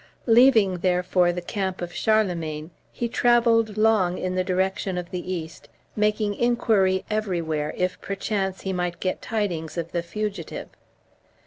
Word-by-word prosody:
Leaving, 225 -6 +5
therefore, 180 0 +2
the 175 0 -5
camp 190 0 -3
of 175 0 -5
Charlemagne, 175 -7 0 0.2
he 235 - -2
travelled 230 -2 +3
long 215 -5 +3
in 185 0 -2
the 185 0 +1
direction 190 0 -1
of 175 -1 -5
the 180 0 -4
East, 165 -3 -6 0.3
making 210 0 +1
inquiry 215 -5 +2
everywhere, 170 -8 -1
if, 180 0 -1
perchance, 195 -1 -2
he 190 - -3
might 180 -1 -2
get 185 - -2
tidings 180 -8 -3
of 170 0 -3
the 170 - -1
fugitive. 205 +4 -5
190 Hz, 140 wpm, -24 LUFS, 175-215 Hz, 0.3 s, Leaving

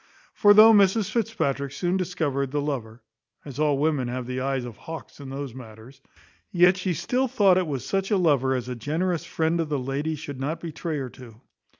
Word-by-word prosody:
For 205 0 +5
though 220 +1 +9
Mrs 200 0 +3
Fitzpatrick 195 - -1
soon 175 +6 -1
discovered 160 -7 -1
the 145 +2 -2
lover 125 -6 -4 0.4
(as 140 -1 -8
all 150 -2 +2
women 145 -3 0
have 125 0 -4
the 125 +1 -4
eyes 135 -1 -1
of 120 -3 -8
hawks 160 +4 -9
in 140 -2 -8
those 135 -2 -6
matters), 120 +2 -13 0.5
yet 180 +1 +5
she 185 -2 -2
still 255 - 0
thought 205 -7 +4
it 180 - -2
was 135 -5 -4
such 195 0 -1
a 205 - +2
lover, 140 -7 +2
as 125 -1 -4
a 125 - -3
generous 160 +7 -2
friend 160 +1 -1
of 160 -2 -1
the 145 - 0
lady 140 +4 -2
should 145 -2 -8
not 150 +5 -3
betray 165 -1 -4
her 135 -3 -4
to. 120 -3 -14
145 Hz, 205 wpm, -25 LUFS, 130-180 Hz, 0.5 s, though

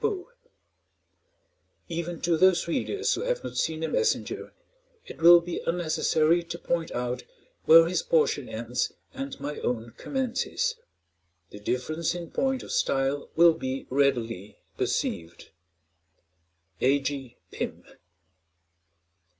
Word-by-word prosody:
Even 170 -1 -4
to 175 -1 +2
those 185 0 +4
readers 405 - 0
who - - -2
have - - -1
not - - -6
seen 160 -1 -1
the 160 - 0
"Messenger," 445 - -1 0.5
it - - -11
will 170 +1 +9
be 170 0 -5
unnecessary 165 -1 +2
to 170 0 -7
point 170 -1 -2
out 125 +1 -2 0.4
where 165 +1 +9
his 180 - 0
portion 485 -2 +1
ends - - -2 0.2
and 275 0 -6
my 150 +1 -5
own 120 -1 -2
commences; 265 - -1 0.8
the 105 - -9
difference 155 +10 -2
in 170 -2 -7
point 265 -1 0
of - - -8
style 135 +1 0
will 170 0 +7
be 135 -4 -4
readily 115 -7 0 0.2
perceived. 85 0 -3 1.3
A. 135 +3 +4
G. 135 -3 -5
PYM. - - -5
165 Hz, 120 wpm, -27 LUFS, 135-175 Hz, 1.3 s, will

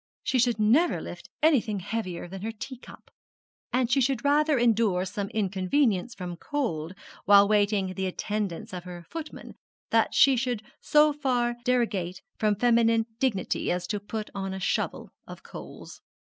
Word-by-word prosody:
She 255 - +1
should 240 -2 +2
never 250 +12 +3
lift - - -9
anything 245 -10 +3
heavier 185 -3 -4
than 190 +1 -8
her 220 +2 -3
teacup; 245 +3 -10 0.6
and 250 -1 +1
she 270 +2 +4
should 265 0 0
rather 300 +1 +3
endure 220 -6 +2
some 200 +2 -4
inconvenience 200 +2 0
from 175 -2 -6
cold 185 - -3 0.3
while 200 0 +7
waiting 205 -2 +2
the 190 0 -2
attendance 210 +2 -3
of 180 -1 -5
her 175 -1 -9
footman 325 -2 -7 0.4
than - - +4
she 275 -1 +5
should 245 -3 -2 0.2
so 300 0 +4
far 250 -4 0
derogate 210 -8 0 0.2
from 210 -1 +2
feminine 230 0 +3
dignity 235 -8 0
as 180 0 -1
to 205 +2 -2
put 215 +1 -6
on 195 -1 -4
a - - -5
shovel 190 - -2 0.2
of - - -10
coals. - - -10
220 Hz, 155 wpm, -27 LUFS, 190-250 Hz, 0.6 s, while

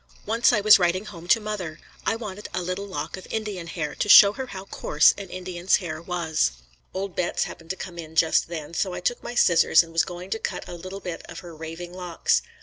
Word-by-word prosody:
Once 230 +4 +3
I 215 -4 +2
was 210 0 +8
writing 180 +3 +1
home 175 -5 -10
to 225 - +5
mother. 205 -7 -5 0.3
I 225 - +2
wanted 210 -3 -7
a 180 - -1
little 185 +3 -4
lock 190 - -5
of 185 - -11
Indian 210 -6 -4
hair 155 -3 -4
to 210 - -2
show 200 0 +10
her 260 +3 -5
how 195 -4 -8
coarse 150 -5 +3
an 200 -2 -8
Indian's 185 0 0
hair 165 -4 -4
was. 165 - 0 0.4
Old 190 0 -4
Betts 180 - 0
happened 165 -1 -9
to 190 - -2
come 175 -2 -8
in 160 -1 -9
just 160 0 +3
then, 165 -2 -7
so 185 +2 -1
I 180 - -4
took 240 +7 -1
my 240 - -7
scissors 170 -5 +5
and 165 0 -14
was 165 - +3
going 180 +1 -8
to 225 - -1
cut - - -4
a - - -7
little 185 +3 -8
bit 175 -2 -5
of 170 0 -8
her 170 -2 -11
"raving 165 +2 -8
locks." 180 -2 0
180 Hz, 235 wpm, -25 LUFS, 170-200 Hz, 0.4 s, show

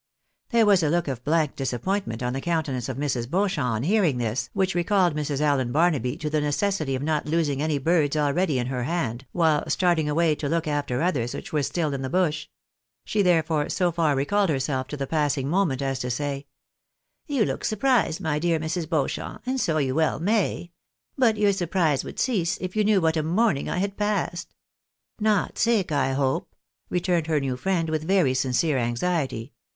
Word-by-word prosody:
There 235 -3 +4
was 200 -3 +5
a 155 - +1
look 170 +1 +1
of 130 -3 -4
blank 155 0 +1
disappointment 135 - -2
on 125 0 -1
the 135 - -3
countenance 140 -7 -2
of 130 - -4
Mrs. 130 -4 -1
Beaucliamp 190 -3 0
on 115 -1 -1
hearing 180 - +2
this, 115 0 -2
which 190 -1 0
recalled 175 -1 +2
Mrs. 150 -2 -2
Allen 140 -5 +1
Barnaby 145 -5 +1
to 155 - -4
the 155 -1 +1
necessity 150 -1 0
of 130 - -4
not 150 -1 -1
losing 150 -3 0
any 155 -1 0
birds 155 0 +1
already 150 +1 +1
in 120 - -1
her 125 -1 -3
hand, 135 -6 -2
while 160 -4 +2
starting 170 -4 +2
away 160 +1 +2
to 145 -1 -3
look 165 0 0
after 145 -2 -1
others 125 -9 0
which - - -8
were 150 - +2
still 155 +1 -1
in 135 - -3
the 130 - -3
bush; 155 -2 0 0.6
she 210 - 0
therefore 160 -4 +2
so 180 -2 +1
far 160 -3 +1
recalled 195 +8 +1
herself 130 -2 -1
to 145 - -6
the 140 - -2
passing 145 -2 0
moment 155 -5 +1
as 135 -1 -1
to 125 - -3
say 140 +2 -3 0.2
— - - -62
" - - -55
You 275 -8 +1
look - - -3
surprised, 220 -6 +1
my 155 -5 -1
dear 165 0 +1
Mrs. 160 +1 -3
Beauchamp, 155 -5 -2
and 260 +1 -1
so 160 -2 +1
you 135 -4 0
well 160 +2 +1
may! 190 -2 0 0.4
But 230 -5 +3
your 205 -1 +3
surprise 170 -6 0
would - - -9
cease 185 -10 0
if 185 +1 -5
you 215 - +3
knew 205 -2 +3
what 160 0 +2
a - - +2
morning 165 -1 +1
I - - -2
had 200 +2 -2
passed." 205 -4 -2 0.3
" - - -52
Not 205 -3 0
sick, 220 -7 +2
I 135 -2 +1
hope? 135 -1 -1 0.2
" - - -49
returned 175 -2 0
her 155 -2 +2
new 135 -2 -2
friend, 170 +4 -1
with 155 -1 0
very 180 -9 +3
sincere 130 +3 +1
anxiety. 125 0 -2
155 Hz, 205 wpm, -25 LUFS, 135-180 Hz, 0.6 s, was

